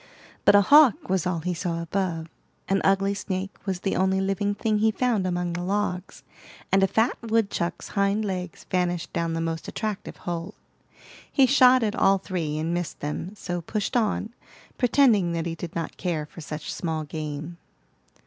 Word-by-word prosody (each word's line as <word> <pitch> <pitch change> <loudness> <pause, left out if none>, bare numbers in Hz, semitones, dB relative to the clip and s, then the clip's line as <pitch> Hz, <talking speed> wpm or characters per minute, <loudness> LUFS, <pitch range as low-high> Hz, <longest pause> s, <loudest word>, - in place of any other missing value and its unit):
But 205 - +7
a 205 - +8
hawk 290 - +6
was 190 -1 +1
all 170 -3 -1
he 180 +2 -1
saw 170 -1 -2
above, 170 -1 -2 0.4
an 195 0 +1
ugly 195 +1 +3
snake 195 -1 -4
was 185 -2 -2
the 195 - -1
only 190 +1 +2
living 195 +1 0
thing 215 0 0
he 220 +1 +4
found 220 -3 +1
among 175 -1 -1
the 175 - -3
logs, 190 -1 -2 0.5
and 195 - +4
a 195 - +5
fat 225 +5 +2
woodchuck's 220 -6 -1
hind 200 +2 +1
legs 180 -3 -5
vanished 175 -2 -1
down 170 -1 -1
the 165 - -1
most 165 0 -3
attractive 215 -3 -4
hole. 175 +3 -5 0.8
He 275 - +5
shot 255 -2 +6
at 210 -2 0
all 195 0 +4
three 170 -6 -3
and 160 +2 -1
missed 175 -2 -3
them, 155 +7 -4
so 175 -3 -4
pushed 210 +7 -3
on, 225 -1 0 0.5
pretending 235 -8 +4
that 165 -1 -2
he 170 - -2
did 165 +1 -7
not 165 -1 -4
care 165 -5 -2
for 165 - -12
such 150 0 -5
small 160 -2 -2
game. 155 +2 -6
185 Hz, 175 wpm, -25 LUFS, 170-205 Hz, 0.8 s, a